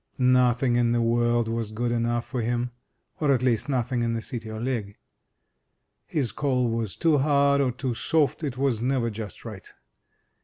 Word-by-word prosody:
Nothing 125 -1 +3
in 120 -1 +2
the 120 - +2
world 120 0 +2
was 115 -1 -3
good 120 +2 -2
enough 120 0 0
for 125 -3 -3
him; 120 +1 -1 0.5
or, 150 -3 +2
at 130 -2 +2
least, 125 +2 +1
nothing 125 -2 0
in 115 0 0
the 115 - -2
City 115 -1 -6
o* 110 - -6
Ligg. 115 -5 -3 1.1
His 135 -6 -1
coal 125 -4 0
was 115 -4 -2
too 160 -4 +3
hard 140 0 +3
or 130 -2 +1
too 125 0 -3
soft; 150 +5 0
it 135 -4 -3
was 130 -5 0
never 125 -2 0
just 105 -3 -8
right. - - -9
120 Hz, 180 wpm, -26 LUFS, 115-130 Hz, 1.1 s, Nothing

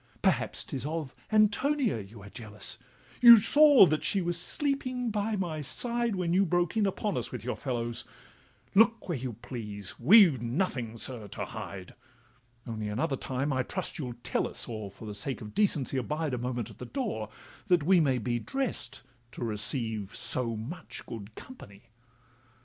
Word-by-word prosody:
'Perhaps - - +1
'tis 130 -3 -5
of 155 -2 -3 0.2
Antonia 215 - +3
you 100 +1 -11
are 100 - -10
jealous, 110 -1 -3 0.4
You 235 -1 +12
saw 290 +1 +7
that 155 -3 0
she 200 - +2
was 175 -1 -1
sleeping 255 -4 -1
by 210 +1 -1
my 170 -6 -2
side 235 - 0
When 175 -2 0
you 190 +2 +5
broke 175 0 +1
in 215 -2 +3
upon 200 +1 -2
us - - -3
with 125 - -6
your 125 - -2
fellows: 120 -3 -3 0.7
Look 225 +1 +4
where 170 -5 -1
you 125 -1 -4
please—we've 120 - +3
nothing, 120 - -2
sir, 115 -3 0
to - - -5
hide; 100 -5 -8 0.7
Only 110 -3 -4
another 130 +8 -1
time, 135 +2 -2
I 130 - +1
trust, 180 +7 -4
you'll 125 -5 -4
tell - - 0
us, - - -5
Or 110 -3 -5
for 100 +3 -12
the 105 - -5
sake 110 +5 -3
of 105 -1 -9
decency 150 -10 +1
abide 150 +3 -2
A 125 - -1
moment 120 -2 -3
at - - -16
the - - -6
door, 210 - -3 0.4
that 180 -6 +4
we 180 +3 +5
may 135 -5 +3
be 120 +1 -1
Drest 270 - -3 0.3
to - - -5
receive 110 -1 -3
so 120 -2 -2
much 150 +10 -7
good 110 -1 -8
company. 115 - -13
135 Hz, 170 wpm, -29 LUFS, -, 0.7 s, You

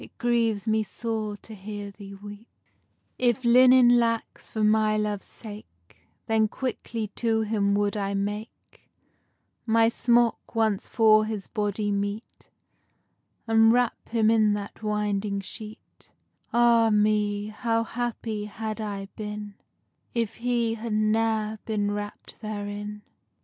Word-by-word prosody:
_ 210 -2 -3 0.7
If 245 0 +1
linen 250 0 +7
lacks, 230 -1 -2
for 220 - -2
my 215 0 +3
love's 210 -2 -2
sake 205 - -10 0.3
Then 220 -1 +2
quickly 230 -3 -4
to 225 +1 0
him 205 -2 +1
would 205 0 +1
I 200 -1 -2
make 205 +3 -6 0.8
My 225 0 +4
smock, 240 0 +1
once 220 -3 +1
for 215 -1 +5
his 215 -3 -4
body 205 -1 -2
meet, 200 +3 -4 1.0
And 225 0 +5
wrap 245 0 0
him 225 -1 +3
in 215 -2 +4
that 205 +1 -6
winding 210 -1 -1
sheet. 215 +3 -11 0.4
Ah 235 -1 +5
me! 210 0 +1
how 230 +1 0
happy 225 -3 -3
had 215 +1 -5
I 200 -2 -4
been, 210 -1 -6 0.6
If 230 -2 -1
he 235 -1 0
had 225 0 -4
ne'er 215 0 +1
been 205 -2 -1
wrapt 205 +2 -7
therein. 205 -1 -5
215 Hz, 110 wpm, -26 LUFS, 205-225 Hz, 1.0 s, linen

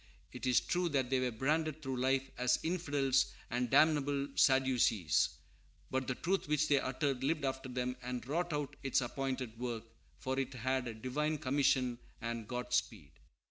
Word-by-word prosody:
It - - -5
is 125 - +5
true 175 -1 0
they 130 -3 +1
were 130 -1 +1
branded 155 +6 -1
through 130 -1 -3
life 135 +1 +1
as 125 0 +2
infidels 145 -6 +1 0.2
and 120 0 0
"damnable 145 -2 +3
Sadducees;" 130 - +3 0.6
but 130 0 -1
the 130 - -1
truth 190 +5 -1
which 150 +1 +2
they 140 -2 +5
uttered 130 0 -1
lived 150 +1 +1
after 130 0 -3
them, 125 0 -2
and 125 -1 -4
wrought 170 +6 -1
out 145 -2 -2
its 135 -1 +2
appointed 125 -2 -3
work, 120 -2 -3 0.3
for 130 +1 -2
it 135 0 -3
had 130 +1 -1
a 115 - -5
Divine 150 +7 -1
commission 130 -3 +1 0.2
and 115 -2 -4
Godspeed. 125 - -2
130 Hz, 160 wpm, -34 LUFS, 125-145 Hz, 0.6 s, is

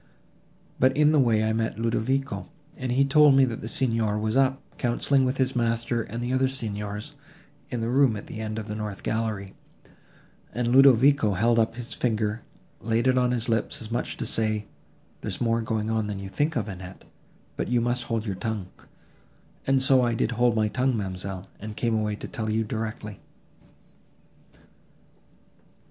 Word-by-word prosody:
But 130 +2 +3
in 150 0 +5
the 155 - +4
way 115 -4 +3
I 110 0 +1
met 110 -1 -1
Ludovico, 120 +4 -1 0.3
and 130 -2 -3
he 135 +3 +3
told 145 0 +6
me 135 0 +6
that 115 -3 -4
the 110 - -5
Signor 115 -3 0
was 110 +2 -1
up, 135 0 +3 0.2
counselling 130 +2 +2
with 130 +1 -1
his 130 0 0
master 115 0 0
and 115 +2 -5
the 125 +1 -1
other 130 0 +3
Signors, 105 0 -5 0.6
in 120 -2 -3
the 115 - -1
room 130 -1 +3
at 100 - -8
the 110 - -8
end 110 0 -4
of 110 -1 -5
the 105 - -4
north 105 -2 -5
gallery; 110 -3 -2 1.0
and 120 0 0
Ludovico 135 -3 +6
held 115 +5 +3
up 115 0 +1
his 120 -1 -7
finger, 110 -2 -1 0.4
and 115 - -9
laid 115 +2 +2
it 130 -1 +4
on 125 0 +2
his 120 -2 0
lips, 115 -2 -1
as 110 -1 -7
much 120 - -2
as - - -11
to - - -4
say—There 110 -2 -4
is - - -5
more 115 -1 +1
going 110 -1 -2
on, 110 -2 0
than 105 -2 -4
you 95 0 -6
think 150 +9 0
of, 115 -3 -1
Annette, 95 -2 -9 0.5
but - - -2
you 120 0 +2
must 120 +1 -1
hold 115 -2 -2
your 100 - -2
tongue. 95 0 -4 1.0
And 135 -1 +3
so 135 -1 +5
I 120 -1 +1
did 115 - 0
hold 120 0 +2
my 110 -1 +2
tongue, 125 +2 0
ma'amselle, 95 -1 -5
and 105 0 -7
came 115 -1 0
away 105 -1 0
to - - -8
tell 110 -6 -4
you 110 +1 +1
directly." 110 -1 -5
115 Hz, 190 wpm, -26 LUFS, 110-125 Hz, 1.0 s, told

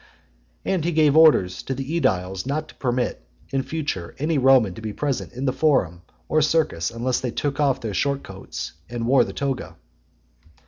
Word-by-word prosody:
And 185 -5 0
he 170 +1 0
gave 155 -2 +4
orders 145 - +5
to 135 - -4
the 135 - -4
ediles 95 - 0
not 150 +3 -2
to - - -12
permit, 125 - -1 0.3
in 135 - +1
future, 140 - -4
any 150 +1 0
Roman 130 -7 +5
to 110 - -10
be 110 -1 -4
present 140 +1 -2
in 125 +3 -5
the 130 - +1
forum 95 - +1 0.3
or 155 - +2
circus 150 - +1
unless 120 +2 -1
they 125 - -3
took 140 +5 -2
off 140 -3 +2
their 110 -3 -4
short 140 +8 0
coats, 95 0 -7 0.2
and 120 -1 -3
wore 130 +3 +5
the - - -5
toga. 135 -3 -3
135 Hz, 185 wpm, -23 LUFS, 110-145 Hz, 0.3 s, orders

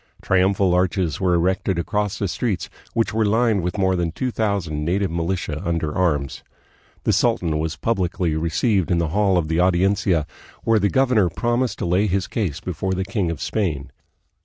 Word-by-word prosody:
Triumphal 95 0 +2
arches 90 -2 0
were 90 -2 +3
erected 95 +1 0
across 105 +3 -1
the 100 - -1
streets, 95 +3 -2 0.2
which 115 -2 +1
were 110 0 +2
lined 110 -1 +2
with 90 +3 -3
more 95 -1 +2
than 85 -2 -1
two 125 +9 -2
thousand 100 -10 -1
native 95 +3 0
militia 85 -2 -2
under 80 -4 -1
arms. 75 -7 0 0.6
The - - +2
sultan 80 -3 +1
was 80 +1 -2
publicly 90 -6 -1
re 80 +2 -1
ceived 95 +1 +1
in 90 - +2
the 85 -2 0
hall 95 +2 +2
of 80 -3 0
the 80 +2 0
Audiencia, 90 -2 +2 0.4
where 115 -1 +3
the 100 0 +2
governor 125 -8 +3
promised 120 +6 -1
to - - -3
lay 90 +5 +2
his 95 -1 0
case 95 - -2
before 95 +2 -3
the 95 +1 -2
king 100 -3 -1
of 85 -4 -4
Spain. 75 -11 -2
95 Hz, 185 wpm, -22 LUFS, 85-100 Hz, 0.6 s, were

